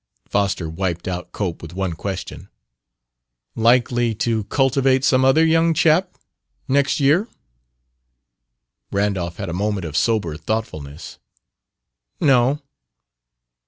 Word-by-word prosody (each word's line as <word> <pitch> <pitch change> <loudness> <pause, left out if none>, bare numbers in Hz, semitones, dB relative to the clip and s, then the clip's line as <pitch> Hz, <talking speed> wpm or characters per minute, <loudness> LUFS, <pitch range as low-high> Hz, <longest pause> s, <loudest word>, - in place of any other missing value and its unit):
Foster 100 -4 0
wiped 85 +1 -3
out 90 -1 -4
Cope 90 -5 -4
with 85 +1 -10
one 95 -2 -2
question. 95 +3 -6 1.0
"Likely 120 0 +2
to 110 -1 -1
'cultivate' 135 +1 +2
some 130 -1 +3
other 135 +5 +5
young 165 0 +3
chap, 165 +4 +2 0.5
next 140 +2 +2
year?" 150 +10 +3 1.6
Randolph 100 -4 -1
had 100 - -5
a 85 - -4
moment 100 0 -2
of 75 -2 -6
sober 90 -5 0
thoughtfulness. 80 -6 -5 1.0
"No." 135 -1 +3
110 Hz, 105 wpm, -21 LUFS, 90-135 Hz, 1.6 s, other